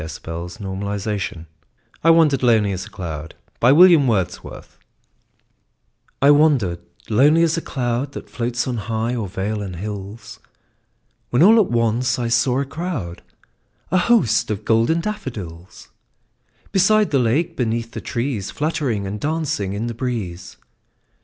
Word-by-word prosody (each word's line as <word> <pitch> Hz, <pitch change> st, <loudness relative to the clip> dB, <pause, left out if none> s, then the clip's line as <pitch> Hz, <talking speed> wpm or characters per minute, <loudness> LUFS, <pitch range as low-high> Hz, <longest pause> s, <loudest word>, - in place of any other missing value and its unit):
William 80 Hz, +1 st, -7 dB, 0.6 s
Wordsworth 100 Hz, -4 st, -3 dB, 0.6 s
I 165 Hz, -, +4 dB
Wandered 160 Hz, -5 st, +4 dB
Lonely 110 Hz, -5 st, +3 dB
As 95 Hz, +1 st, -5 dB
a -, -, -14 dB
Cloud 80 Hz, -7 st, -7 dB, 0.3 s
I 125 Hz, -, +6 dB, 2.6 s
WANDERED 140 Hz, -, +3 dB, 0.3 s
lonely 145 Hz, +9 st, +4 dB
as 165 Hz, -1 st, +2 dB
a 165 Hz, -, -2 dB
cloud 125 Hz, +1 st, -3 dB
That -, -, -8 dB
floats 120 Hz, 0 st, -3 dB
on 125 Hz, -2 st, -2 dB
high 115 Hz, +2 st, -2 dB
o'er 115 Hz, -5 st, -3 dB
vales 100 Hz, +3 st, -3 dB
and 95 Hz, -3 st, -6 dB
hills, 100 Hz, +3 st, -7 dB, 0.9 s
When 125 Hz, +6 st, +3 dB
all 225 Hz, +4 st, +7 dB
at 210 Hz, -, +2 dB
once 120 Hz, +2 st, +1 dB
I 120 Hz, -2 st, -2 dB
saw 120 Hz, +3 st, +2 dB
a -, -, -2 dB
crowd, 140 Hz, -, -5 dB, 0.7 s
A 185 Hz, -, +3 dB
host, 180 Hz, -, +2 dB
of 105 Hz, 0 st, -4 dB
golden 115 Hz, +9 st, +2 dB
daffodils; 100 Hz, -, -7 dB, 0.8 s
Beside 210 Hz, +2 st, +3 dB
the 140 Hz, -, +3 dB
lake, 150 Hz, +9 st, 0 dB
beneath 115 Hz, -2 st, -2 dB
the -, -, -6 dB
trees, 115 Hz, -5 st, -3 dB
Fluttering 140 Hz, -9 st, -2 dB
and 100 Hz, +2 st, -5 dB
dancing 145 Hz, -10 st, -2 dB
in 105 Hz, +3 st, -3 dB
the 120 Hz, -, -3 dB
breeze. 110 Hz, -8 st, -5 dB
115 Hz, 135 wpm, -20 LUFS, 100-145 Hz, 2.6 s, all